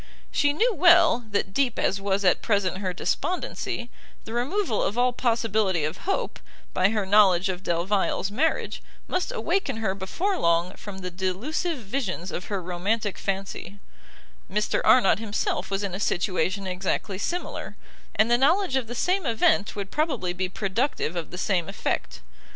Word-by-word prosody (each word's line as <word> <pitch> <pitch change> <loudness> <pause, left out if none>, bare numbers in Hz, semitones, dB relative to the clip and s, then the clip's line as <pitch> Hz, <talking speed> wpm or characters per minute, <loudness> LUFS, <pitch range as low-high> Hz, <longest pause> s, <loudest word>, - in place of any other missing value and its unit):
She 290 -1 +3
knew 445 +11 +2
well, 335 - +5
that 200 -2 -1
deep 265 -2 +1
as 195 - 0
was 195 0 0
at 180 - +4
present 195 -4 +1
her 190 -2 -1
despondency, 240 - -2 0.3
the 220 - -7
removal 255 - 0
of 210 - -1
all 250 0 +3
possibility 220 -8 +1
of 155 +1 -2
hope, 390 - -1 0.3
by 185 +1 +3
her 210 -2 0
knowledge 190 -2 +5
of 180 -1 -3
Delvile's 190 +3 0
marriage, 300 +10 0 0.3
must 365 +6 -1
awaken 390 - -1
her 220 -4 0
before 345 - -2
long 170 +2 +2
from 205 -2 -9
the 180 0 -5
delusive 210 - -2
visions 200 -6 -3
of 180 - -4
her 200 -3 -3
romantic 195 +4 -1
fancy; 195 0 -4 0.7
Mr 210 +2 +1
Arnott 225 -5 +5
himself 220 -2 -2
was 195 +1 -1
in 195 -3 -3
a 190 - -3
situation 185 0 0
exactly 190 +1 -2
similar, 350 - -4 0.4
and 220 +2 +3
the 240 - +5
knowledge 330 +3 +3
of 260 -4 0
the 240 - -6
same 365 +9 +1
event 220 -2 +2
would 200 -2 -5
probably 275 - 0
be 185 +1 -2
productive 195 - -1
of 170 -2 -3
the 180 - -8
same 180 -3 0
effect. - - -3
205 Hz, 160 wpm, -26 LUFS, 185-250 Hz, 0.7 s, well